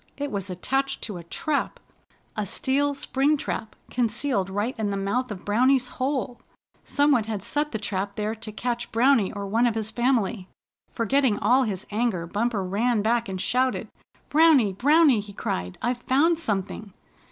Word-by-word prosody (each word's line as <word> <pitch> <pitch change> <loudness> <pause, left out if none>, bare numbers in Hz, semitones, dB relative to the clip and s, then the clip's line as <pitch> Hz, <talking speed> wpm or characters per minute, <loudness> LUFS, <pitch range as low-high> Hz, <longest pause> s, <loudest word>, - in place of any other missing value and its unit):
It 285 0 -3
was 200 -1 -3
attached 270 +10 -2
to 210 -5 -5
a 170 - -9
trap, 285 - -2 0.6
a 215 - -1
steel 280 +7 +1
spring 280 +2 +1
trap, 220 -5 -4 0.2
concealed 235 -4 0
right 205 +6 -1
in 210 -2 0
the 200 - -2
mouth 220 +6 -1
of 200 -4 -7
Browny's 255 +4 +3
hole. 265 -4 -3 0.4
Some 290 +1 +2
one 240 -6 +3
had 215 -3 -4
set 295 +5 -1
the 220 - -2
trap 200 -1 -3
there 215 +1 -2
to 220 -1 -8
catch 240 +2 -3
Browny 235 -3 +3
or 200 -1 -5
one 225 +5 +2
of 230 - -1
his 220 -1 -3
family. 235 -6 0 0.4
Forgetting 240 -1 +1
all 255 +1 +3
his 195 -4 -4
anger, 210 -6 0
Bumper 210 +3 -1
ran 210 +4 0
back, 230 -1 +1
and 190 -1 -4
shouted. 255 +6 0 0.4
"Browny! 295 -10 +5
Browny!" 285 - +4
he 205 0 -8
cried. 90 - -4
"I've 245 +1 0
found 315 +7 +2
something!" 205 - -3
230 Hz, 170 wpm, -25 LUFS, 205-265 Hz, 0.6 s, Browny